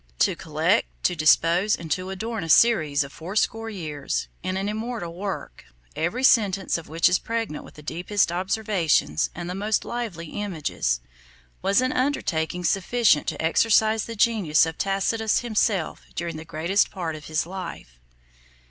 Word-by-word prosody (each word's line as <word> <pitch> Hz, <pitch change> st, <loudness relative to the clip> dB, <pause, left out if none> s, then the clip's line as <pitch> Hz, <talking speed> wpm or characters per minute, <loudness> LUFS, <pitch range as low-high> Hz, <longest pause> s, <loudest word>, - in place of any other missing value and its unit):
To -, -, +2 dB
collect, -, -, +1 dB, 0.2 s
to 180 Hz, -, +2 dB
dispose, 170 Hz, +5 st, +4 dB
and 165 Hz, -2 st, -9 dB
to 185 Hz, 0 st, -1 dB
adorn 220 Hz, +2 st, -4 dB
a 165 Hz, -, -6 dB
series 155 Hz, -9 st, +4 dB
of 140 Hz, -, -11 dB
fourscore 215 Hz, +6 st, -1 dB
years, 155 Hz, -9 st, -4 dB
in 185 Hz, +1 st, -2 dB
an 195 Hz, +1 st, -2 dB
immortal 215 Hz, -4 st, -4 dB
work, 195 Hz, +2 st, -6 dB, 0.3 s
every 205 Hz, +11 st, -1 dB
sentence 200 Hz, -7 st, +3 dB
of 170 Hz, -, -5 dB
which 165 Hz, +2 st, +3 dB
is 180 Hz, -, +3 dB
pregnant 225 Hz, -9 st, -3 dB
with -, -, -15 dB
the 150 Hz, -, -12 dB
deepest 175 Hz, +5 st, 0 dB
observations 180 Hz, -, +1 dB
and 175 Hz, 0 st, -5 dB
the 180 Hz, -, -3 dB
most 210 Hz, +3 st, 0 dB
lively 200 Hz, -10 st, -5 dB
images, 155 Hz, -, -2 dB, 0.6 s
was 200 Hz, +4 st, +3 dB
an 255 Hz, 0 st, +1 dB
undertaking 180 Hz, -, -1 dB
sufficient 195 Hz, 0 st, +2 dB
to -, -, -3 dB
exercise 220 Hz, +6 st, +3 dB
the 230 Hz, -, -6 dB
genius 205 Hz, -9 st, +3 dB
of 160 Hz, 0 st, -6 dB
Tacitus 205 Hz, +3 st, +1 dB
himself 215 Hz, -7 st, 0 dB
during 170 Hz, -1 st, -3 dB
the 155 Hz, +1 st, -8 dB
greatest 165 Hz, +5 st, +1 dB
part 170 Hz, -4 st, -4 dB
of 150 Hz, -, -10 dB
his 155 Hz, 0 st, -1 dB
life. 175 Hz, -, -8 dB
185 Hz, 155 wpm, -24 LUFS, 160-215 Hz, 0.6 s, dispose